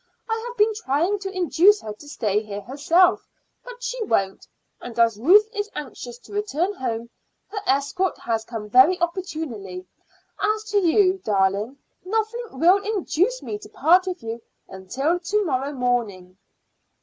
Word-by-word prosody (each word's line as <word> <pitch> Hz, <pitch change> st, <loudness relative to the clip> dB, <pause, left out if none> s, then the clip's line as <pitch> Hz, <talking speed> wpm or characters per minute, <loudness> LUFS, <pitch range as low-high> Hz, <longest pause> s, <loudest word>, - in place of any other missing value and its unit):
I 450 Hz, 0 st, -2 dB
have 485 Hz, -, -8 dB
been 430 Hz, +1 st, +3 dB
trying 360 Hz, +1 st, 0 dB
to 390 Hz, 0 st, -5 dB
induce 370 Hz, +2 st, +4 dB
her 215 Hz, -, -6 dB
to 290 Hz, +8 st, -15 dB
stay 210 Hz, -7 st, 0 dB
here 205 Hz, -1 st, -7 dB
herself, 325 Hz, -, +2 dB, 0.4 s
but -, -, -11 dB
she -, -, -3 dB
won't; 195 Hz, -, -1 dB, 0.3 s
and 240 Hz, -1 st, -9 dB
as 230 Hz, -2 st, +3 dB
Ruth 395 Hz, -, +6 dB
is 415 Hz, -1 st, -3 dB
anxious 245 Hz, -4 st, -7 dB
to 250 Hz, -, -16 dB
return 405 Hz, -2 st, -1 dB
home, 235 Hz, -, -4 dB, 0.4 s
her 415 Hz, +1 st, -4 dB
escort 280 Hz, +7 st, 0 dB
has 225 Hz, -1 st, -2 dB
come 220 Hz, -2 st, -7 dB
very 260 Hz, -, +5 dB
opportunely. 310 Hz, -, -4 dB, 0.5 s
As 430 Hz, +1 st, 0 dB
to 410 Hz, -, +4 dB
you, 370 Hz, +1 st, +3 dB
darling, 200 Hz, +5 st, 0 dB, 0.3 s
nothing 445 Hz, +5 st, -2 dB
will 355 Hz, +9 st, +4 dB
induce 425 Hz, +3 st, 0 dB
me 415 Hz, -, -5 dB
to 420 Hz, 0 st, -13 dB
part 360 Hz, +4 st, +3 dB
with 360 Hz, -9 st, -4 dB
you 225 Hz, +1 st, -5 dB, 0.3 s
until 260 Hz, -, -2 dB
to 410 Hz, +4 st, 0 dB
morrow 275 Hz, -2 st, -1 dB
morning." 235 Hz, -9 st, -2 dB
320 Hz, 155 wpm, -23 LUFS, -, 0.5 s, Ruth